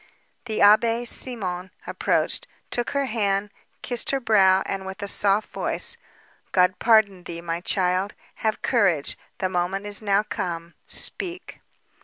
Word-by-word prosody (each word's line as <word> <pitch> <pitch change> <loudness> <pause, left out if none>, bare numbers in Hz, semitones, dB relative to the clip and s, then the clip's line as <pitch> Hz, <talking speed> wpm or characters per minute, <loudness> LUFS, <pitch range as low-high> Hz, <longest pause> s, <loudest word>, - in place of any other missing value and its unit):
The 220 -3 -2
Abbé 230 +3 +5
Simon 190 -8 -3 0.2
approached, - - 0 0.2
took 240 -1 -1
her 280 -1 0
hand, 205 -4 0 0.3
kissed 245 -1 0
her 275 - +2
brow, 195 -6 +4
and 195 -1 -3
with 190 +2 -7
a - - -3
soft 200 +1 +1
voice: - - -1 0.6
"God 180 0 +3
pardon 210 -5 +4
thee, 170 0 -6
my 170 0 -3
child; 185 +2 0 0.2
have 220 -1 -1
courage, 195 - +2 0.2
the 190 - 0
moment 185 +2 -1
is 205 0 -2
now 200 -1 +2
come, 170 -4 -4
speak." 360 0 -3
200 Hz, 140 wpm, -24 LUFS, 185-225 Hz, 0.6 s, Abbé